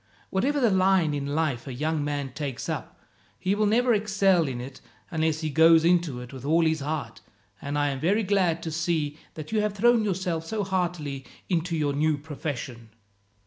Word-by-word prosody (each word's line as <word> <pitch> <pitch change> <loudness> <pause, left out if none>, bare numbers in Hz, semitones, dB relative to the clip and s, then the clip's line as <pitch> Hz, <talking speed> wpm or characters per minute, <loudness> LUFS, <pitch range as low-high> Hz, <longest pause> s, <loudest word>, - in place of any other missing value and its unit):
Whatever 275 +10 +1
the 240 -5 +3
line 185 -4 +3
in 140 -1 -3
life 145 -6 -1
a 130 - -5
young 155 +2 -1
man 145 -3 -3
takes 140 -4 -4
up, - - -5 0.4
he 185 +2 0
will 210 +1 +2
never 240 +3 +3
excel 195 -5 +2
in 125 -2 -4
it 130 +2 -9 0.3
unless 160 -1 0
he 155 -1 -2
goes 160 +2 +6
into 170 -7 +2
it 125 +2 -10
with 130 -2 -9
all 165 +4 +3
his 160 -1 +1
heart, 150 +1 -4 0.4
and 145 +1 -3
I 145 0 +2
am 135 -1 -3
very 200 +9 +2
glad 185 -4 +1
to 160 - -4
see 155 -2 -1 0.2
that 155 +3 -8
you 215 -1 +2
have 210 -1 -1
thrown 235 +2 +4
yourself 180 -5 -1
so 210 +5 -3
heartily 170 -8 -2 0.2
into 170 -2 0
your 145 -2 0
new 150 +1 +1
profession. 135 -6 -6
160 Hz, 190 wpm, -26 LUFS, 145-190 Hz, 0.4 s, goes